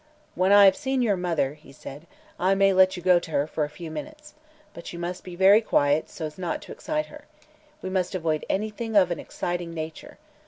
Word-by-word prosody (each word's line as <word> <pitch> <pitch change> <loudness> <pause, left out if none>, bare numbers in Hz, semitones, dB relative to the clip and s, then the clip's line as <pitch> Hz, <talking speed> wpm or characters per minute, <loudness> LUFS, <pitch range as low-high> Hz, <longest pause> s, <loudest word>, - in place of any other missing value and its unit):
"When 185 +3 +1
I 205 0 +8
have 190 -1 +6
seen 265 -3 -1
your 210 -4 +2
mother," 155 -6 -2
said 140 +2 -10
he, 170 - -25 0.3
"I 190 +2 +2
may 195 0 +4
let 185 0 +4
you 175 - -8
go 180 -1 +5
to 170 - -10
her 145 -2 0
for 155 0 -3
a - - -9
few 160 +1 -9
minutes. 300 - -9 0.4
But 170 - -9
you 170 - -8
must 175 +1 -5
be 180 -1 -9
very 195 +4 +6
quiet, 145 -7 +1
so 160 - -6
as 155 +3 -8
not 175 -3 -3
to - - -12
excite 305 0 -3
her. 300 0 -14 0.6
We 185 - -4
must 185 0 -1
avoid 160 -3 -1
anything 215 +2 -3
of 185 -3 +5
an 170 - -2
exciting 175 -1 -5
nature. 160 0 -7
180 Hz, 225 wpm, -25 LUFS, 165-200 Hz, 0.6 s, I